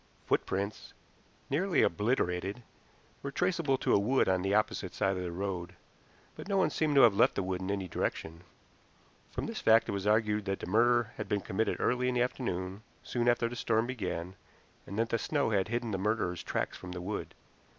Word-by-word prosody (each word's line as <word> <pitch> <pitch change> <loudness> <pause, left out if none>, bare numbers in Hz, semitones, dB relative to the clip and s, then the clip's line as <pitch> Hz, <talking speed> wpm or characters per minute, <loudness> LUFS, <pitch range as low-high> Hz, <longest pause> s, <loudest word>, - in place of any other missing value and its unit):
Footprints, 100 +2 -2 0.5
nearly 175 +6 +2
obliterated, 100 +1 0 0.6
were 140 - -4
traceable 165 -2 +1
to - - +1
a - - +5
wood 125 +7 +2
on 95 -1 +2
the 95 +1 -1
opposite 105 - 0
side 95 0 +1
of 90 - -3
the 90 -1 -3
road, 90 -1 -4 0.6
but - - -9
no 200 -1 +1
one 190 - +3
seemed 155 -2 0
to 135 - +8
have 115 -4 +7
left 100 - +4
the 100 - 0
wood 95 0 -2
in 95 - -4
any 100 -2 -2
direction. 80 0 -3 0.9
From - - -4
this - - -5
fact 110 0 +5
it - - -2
was 100 0 -2
argued 105 -1 +2
that 95 -1 -2
the - - -5
murder 120 +4 +3
had - - -5
been 105 -2 +1
committed 105 +3 -1
early 125 +1 +1
in 125 - -1
the 120 - +3
afternoon, 95 -6 -3 0.2
soon 120 -1 0
after 120 -1 +2
the 120 - -6
storm 115 -1 +1
began, 95 -8 -4 0.5
and 100 - -6
that 115 +1 +1
snow 145 -6 0
had 100 -3 +2
hidden 120 0 -2
the 95 - -2
murderer's 100 -4 0
tracks - - -2
from 90 0 -8
the 90 - -5
wood. 100 +4 -5
105 Hz, 200 wpm, -31 LUFS, 95-120 Hz, 0.9 s, to